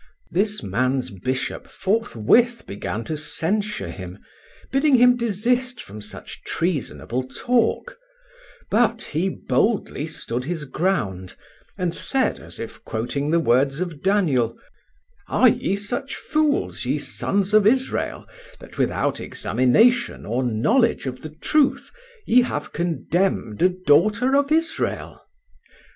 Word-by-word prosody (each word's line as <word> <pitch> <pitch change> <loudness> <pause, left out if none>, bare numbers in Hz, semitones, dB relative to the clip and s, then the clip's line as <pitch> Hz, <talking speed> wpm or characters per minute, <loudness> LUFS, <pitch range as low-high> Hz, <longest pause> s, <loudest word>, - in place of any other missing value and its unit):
This 205 - 0
man's 125 +6 0
bishop 130 +8 -3
forthwith 225 - +1
began 105 +3 -4
to 155 - -4
censure 200 +7 -2
him, 90 -1 -8 0.5
bidding 275 +1 +4
him 245 0 +6
desist 245 +2 0
from 105 +2 -9
such 105 - -8
treasonable 145 -6 -2
talk, 225 - 0 0.7
but 230 +1 +2
he 170 +6 -1
boldly 200 -7 0
stood 125 -5 -4
his 160 -1 -3
ground, 130 - -2 0.4
and 180 -2 -1
said, 265 +8 0
as - - -11
if 115 - -8
quoting 120 +6 -2
the 170 +2 +3
words 135 0 +2
of 170 -5 -4
Daniel: 150 - +2 0.7
"'Are 255 - +5
ye 195 - 0
such 245 +7 -4
fools, 310 -1 0
ye - - 0
sons 200 0 -1
of 215 -1 +6
Israel, 260 +3 0 0.3
that - - -13
without - - 0
examination 235 - +2
or 120 +4 -1
knowledge 210 - +2
of 130 -1 -5
the 155 - -7
truth 275 - +1 0.3
ye 250 +2 +5
have 150 -12 -3
condemned 170 - -1
a 180 - +6
daughter 195 - +3
of 285 +1 +2
Israel? 325 +1 -1
180 Hz, 125 wpm, -23 LUFS, -, 0.7 s, him